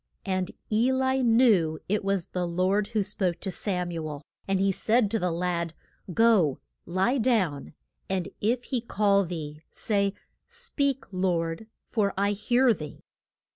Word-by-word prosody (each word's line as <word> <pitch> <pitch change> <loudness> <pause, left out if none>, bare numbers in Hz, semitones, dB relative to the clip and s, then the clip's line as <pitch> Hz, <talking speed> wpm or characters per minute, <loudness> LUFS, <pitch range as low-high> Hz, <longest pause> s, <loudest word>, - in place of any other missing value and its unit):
And 185 -2 -1 0.2
E 230 +4 +3
li 260 0 +1
knew 225 -10 +4
it 205 +1 0
was 195 -3 0
the 180 -1 -3
Lord 185 +4 +1
who 215 -2 0
spoke 185 -3 -1
to 190 - -2
Sam 180 -3 -2
u 165 -2 -4
el. 145 -1 -7 0.2
And 195 -1 +1
he 195 0 +3
said 215 +3 +2
to 225 - +1
the 180 - 0
lad, 170 -1 -2 0.4
Go, 195 - +4 0.3
lie 190 +10 +1
down, 190 - 0 0.3
and 190 -2 -1
if 235 +4 +1
he 250 -2 -2
call 200 -3 +2
thee, 155 -4 -6
say, 200 -2 0 0.3
Speak, 290 - -1
Lord, 180 0 -1 0.2
for 205 -4 0
I 200 +1 +2
hear 240 +4 +3
thee. 150 -6 -9
195 Hz, 155 wpm, -27 LUFS, 175-225 Hz, 0.4 s, knew